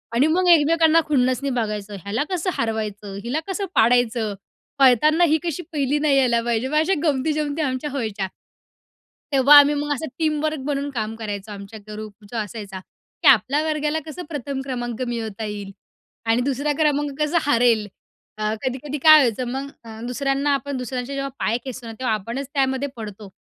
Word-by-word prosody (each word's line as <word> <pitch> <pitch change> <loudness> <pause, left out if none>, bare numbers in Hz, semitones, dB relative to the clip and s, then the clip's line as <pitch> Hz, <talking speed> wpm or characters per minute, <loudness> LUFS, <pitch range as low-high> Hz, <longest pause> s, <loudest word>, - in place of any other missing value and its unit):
आणि 265 +6 +4
मग 360 +3 +2
एकमेकांना 325 0 +5
खुन्नसनी 260 -1 +1
बघायचं, 210 -4 -3
ह्याला 215 +7 -1
कसं 370 0 -1
हरवायचं, 210 -3 -3
हिला 255 +7 -1
कसं 390 +1 -2
पाडायचं? 230 -2 +3 0.5
पळताना 290 +6 +5
ही 315 -2 +4
कशी 345 0 -3
1ली 285 -1 0
नाही 290 -2 +3
यायला 240 -3 +3
पाहिजे. 235 +1 0
मग 305 - -3
अशा 320 +5 +3
गमती-जमती 300 +1 0
आमच्या 265 0 -2
व्हायच्या. 215 -7 -3 1.0
तेव्हा 280 +2 +7
आम्ही 290 +1 +4
मग 290 0 -1
असं 305 +3 -4
टीमवर्क 310 -1 0
बनून 285 0 -2
काम 220 -3 -3
करायचो 210 -2 -6
आमच्या 200 +2 -9
ग्रुप 210 0 -9
जो 235 - -4
असायचा 205 -3 -5 0.4
की - - +4
आपल्या 270 +3 +5
वर्गाला 305 0 0
कसं 320 +3 -7
प्रथम 280 -3 -4
क्रमांक 240 -3 -4
मिळवता 225 -3 -4
येईल 205 -2 -6 0.5
आणि 225 +2 +2
2रा 280 +3 0
क्रमांक 295 -1 +1
कसं 300 +3 +2
हरेल, 230 -4 +3 0.5
अ, 215 0 -1
कधी-कधी 265 +3 -3
काय 310 -1 +10
व्हायचं 245 -2 0
मग 270 +2 -4 0.2
अ, 220 -1 -9
दुसऱ्यांना 275 +3 0
आपण 275 +1 -4
दुसऱ्यांचे 250 +1 -4
जेव्हा 275 0 -3
पाय 230 - +1
खेचतो 255 -2 -7
ना, 225 - -6
तेव्हा 250 -4 0
आपणच 235 +7 -5
त्यामध्ये 270 0 0
पडतो. 210 -3 -8
260 Hz, 165 wpm, -22 LUFS, 225-295 Hz, 1.0 s, काय